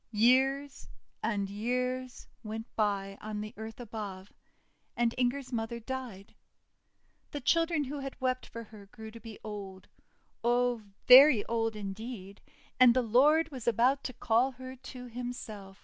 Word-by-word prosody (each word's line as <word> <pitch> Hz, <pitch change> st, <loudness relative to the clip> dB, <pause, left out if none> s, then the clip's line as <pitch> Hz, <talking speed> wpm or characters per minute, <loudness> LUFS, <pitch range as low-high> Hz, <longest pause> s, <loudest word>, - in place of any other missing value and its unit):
Years 265 Hz, +5 st, +2 dB, 0.3 s
and 205 Hz, -3 st, -1 dB
years 250 Hz, +5 st, -3 dB
went 220 Hz, 0 st, -5 dB
by 200 Hz, -2 st, -1 dB
on 215 Hz, -1 st, -5 dB
the 215 Hz, +1 st, -7 dB
earth 220 Hz, +2 st, -8 dB
above, 205 Hz, -4 st, -7 dB, 0.6 s
and 235 Hz, -1 st, +2 dB
Inger's 255 Hz, +1 st, -1 dB
mother 235 Hz, +1 st, -2 dB
died. 235 Hz, -5 st, -7 dB, 1.0 s
The 290 Hz, -, -5 dB
child 330 Hz, +5 st, +2 dB
who 295 Hz, -4 st, -1 dB
had 275 Hz, -1 st, -7 dB
wept 255 Hz, -1 st, -1 dB
for 230 Hz, -, -8 dB
her 210 Hz, -2 st, -14 dB
grew 220 Hz, 0 st, -10 dB
to 230 Hz, -, -11 dB
be 225 Hz, -1 st, -10 dB
old 200 Hz, -3 st, -8 dB, 0.5 s
oh, 245 Hz, 0 st, +2 dB, 0.2 s
very 255 Hz, -3 st, +9 dB
old 225 Hz, -1 st, -1 dB
in 200 Hz, -2 st, -4 dB
deed, 200 Hz, -3 st, -8 dB, 0.4 s
and 250 Hz, -1 st, +8 dB
the 255 Hz, -, +3 dB
Lord 290 Hz, +9 st, +4 dB
was 250 Hz, -4 st, -8 dB
about 250 Hz, +4 st, +3 dB
to 255 Hz, -, -3 dB
call 240 Hz, +3 st, +2 dB
her 255 Hz, +1 st, -9 dB
to 250 Hz, 0 st, -10 dB
Himself. 230 Hz, -5 st, -7 dB
235 Hz, 150 wpm, -31 LUFS, 215-255 Hz, 1.0 s, very